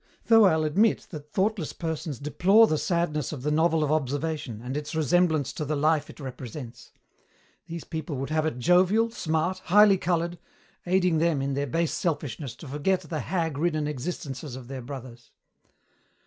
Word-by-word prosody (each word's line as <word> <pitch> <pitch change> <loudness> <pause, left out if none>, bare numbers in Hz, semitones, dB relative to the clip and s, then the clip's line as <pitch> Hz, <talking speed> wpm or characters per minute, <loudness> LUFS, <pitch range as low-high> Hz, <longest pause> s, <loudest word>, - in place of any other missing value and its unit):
Though 225 -2 +7
I'll 160 -4 +3
admit 195 +9 +2
that 150 -3 -9
thoughtless 195 -4 0
persons 160 -4 -4
deplore 190 - +4
the 155 -8 0
sadness 170 -5 -1
of 140 -5 -6
the 150 - 0
novel 160 +1 +2
of 150 - 0
observation 145 -4 -2
and 125 +3 -5
its 150 +2 -4
resemblance 160 -2 +2
to 155 - -4
the 150 +1 -1
life 150 +1 +1
it - - -12
represents. 130 -2 -8 0.8
These 170 -1 -6
people 160 -2 -5
would 135 +3 -4
have 155 0 +1
it 140 - -3
jovial, 185 - +3
smart, 165 -1 -1
highly 200 +1 +6
coloured, 170 -1 -1 0.5
aiding 180 -3 +2
them, 165 -3 +2
in 135 0 -1
their 140 +1 -1
base 165 +5 0
selfishness, 145 - -3
to 160 - -11
forget 150 +7 0
the 155 -2 -4
hag 160 0 -2
ridden 155 -2 0
existences 145 -2 -5
of 130 -1 -10
their 135 -1 -5
brothers. 120 -3 -9
155 Hz, 170 wpm, -26 LUFS, 140-175 Hz, 0.8 s, Though